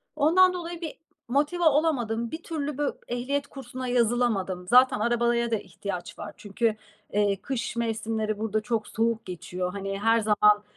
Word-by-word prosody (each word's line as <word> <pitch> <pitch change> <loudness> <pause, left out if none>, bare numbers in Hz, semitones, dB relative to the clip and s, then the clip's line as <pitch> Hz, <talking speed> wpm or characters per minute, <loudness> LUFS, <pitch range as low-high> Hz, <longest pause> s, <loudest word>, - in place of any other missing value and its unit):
Ondan 350 +5 +5
dolayı 345 -1 -5
bir 320 - -6 0.3
motive 295 +8 +1
olamadım. 265 -8 +2
Bir 320 +1 -6
türlü 300 -4 -3
bö 290 -1 +1 0.2
ehliyet 275 +4 -2
kursuna 255 -1 -7
yazılamadım. 230 -7 +1
Zaten 250 -1 +6
arabaya 235 +1 +1
da - - +3
ihtiyaç 190 -3 -6
var. 205 -1 -6
Çünkü, 215 +2 0 0.4
eee, 205 -1 +3
kış 250 0 -3
mevsimleri 220 -2 -1
burada 215 0 0
çok 220 -1 -2
soğuk 230 0 0
geçiyor. 180 0 -4
Hani, 195 0 -4
her 225 +2 +4
zaman 210 -1 +4
230 Hz, 150 wpm, -27 LUFS, 210-275 Hz, 0.4 s, Zaten